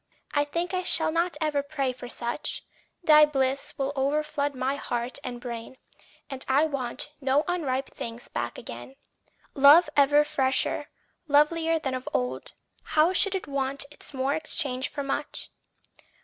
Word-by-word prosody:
I 290 -1 +2
think 340 +5 -3
I 365 - +1
shall 320 -3 +1
not 340 +2 0
ever 305 -3 +1
pray 280 -3 -2
for 245 -1 -9
such; 240 +4 -3 0.4
Thy 305 -2 +8
bliss 275 -2 0
will 275 0 -1
overflood 285 +1 0
my 260 +1 0
heart 245 -2 -3
and 245 -1 -5
brain, 240 +1 -7 0.5
And 270 -2 -3
I 275 +4 +4
want 275 -1 -3
no 270 +2 +2
unripe 275 -7 -1
things 230 +1 -7
back 120 0 -4
again. 120 +3 -9 0.6
Love 295 +4 +7
ever 290 +1 +5
fresher, 275 -3 0 0.4
lovelier 320 +3 +3
than 270 -4 -3
of 255 0 -4
old 125 +1 -2 0.3
How 315 +4 +2
should 390 +1 +3
it 380 - -3
want 275 0 -1
its - - -7
more 270 0 0
exchanged 285 -4 -2
for 285 - -4
much? 285 +2 -3
280 Hz, 150 wpm, -27 LUFS, 260-305 Hz, 0.6 s, Thy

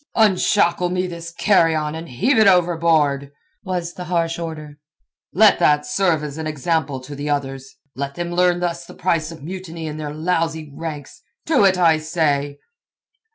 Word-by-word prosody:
"Unshackle 185 -4 +3
me 180 +1 -1
this 170 -2 -7
carrion, 165 -5 +2
and 165 0 -7
heave 225 - +1
it 220 - +6
overboard," 165 -6 +2 0.3
was 180 -4 -4
the 180 - -7
harsh 170 -1 -1
order. 155 -3 -7 0.5
"Let 210 +2 +5
that 150 0 +3
serve 185 -10 +1
as 150 +1 -6
an 160 - -3
example 150 -2 -1
to 145 +3 -9
the 145 +1 -5
others. 135 -2 -3 0.2
Let 140 +1 -4
them 175 0 -4
learn 175 0 +2
thus 170 -1 -2
the - - -13
price 165 -3 -1
of 160 -4 -11
mutiny 170 -1 -7
in 155 -1 -5
their 150 -1 -5
lousy 160 -1 -2
ranks. 150 -4 -7 0.2
To 275 -10 +3
it, 190 -1 +4
I 165 -3 +4
say." 145 -3 -1
165 Hz, 165 wpm, -20 LUFS, 150-180 Hz, 0.5 s, it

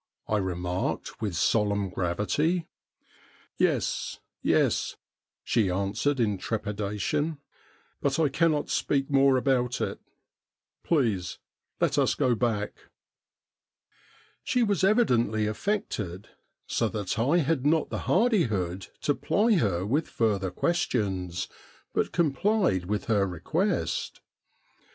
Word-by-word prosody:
' - - -52
I 110 - +1
remarked 90 0 -3
with 100 -6 -2
solemn 100 +1 +1
gravity. 105 - 0 0.9
'Yes, - - 0 0.2
yes,' - - +2 0.5
she 110 -5 +2
answered 100 +9 0
in 105 -5 +1
trepidation; 110 - -2 0.6
'but 140 -1 +1
I 160 - +4
cannot 155 +1 +1
speak 135 0 0
more 135 -1 +5
about 125 -2 +1
it. - - -2 0.8
Please 110 - 0 0.4
let - - +2
us - - +2
go 125 - +2
back.' 110 -3 -2 1.6
She 250 - +2
was 205 -3 +1
evidently 120 - +3
affected 105 - -3 0.4
so - - 0
that 105 0 -3
I 140 +9 +3
had 155 -4 +1
not 155 +2 +2
the - - -2
hardihood 110 - +1
to 145 - +2
ply 205 - +2
her 95 - +1
with 145 +9 0
further 100 -5 0
questions, 95 - -1 0.5
but - - 0
complied 170 - +1
with 105 +1 -2
her 100 -3 +2
request. 160 - -1
115 Hz, 110 wpm, -27 LUFS, 100-150 Hz, 1.6 s, more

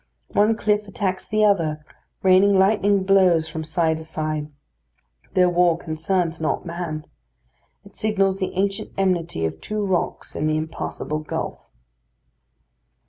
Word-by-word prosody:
One 215 +2 +3
cliff 210 0 +1
attacks 190 -1 -2
the 215 0 +2
other, 155 -7 +1 0.4
raining 190 +1 +5
lightning 200 0 +3
blows 185 -4 +4
from 160 0 -5
side 160 0 0
to 160 - -8
side. 155 -1 -3 0.8
Their 180 -1 +5
war 175 -1 +3
concerns 165 +1 -2
not 160 - -1
man. 170 -3 -5 0.8
It - - -16
signals 195 -3 +1
the 185 - -2
ancient 195 +1 -1
enmity 175 - 0
of 80 0 -4
two 210 -1 -2
rocks 185 -3 -2
in 155 - 0
the 155 0 +1
impassable 155 -1 -4
gulf. 155 - -5
180 Hz, 135 wpm, -23 LUFS, 160-195 Hz, 0.8 s, raining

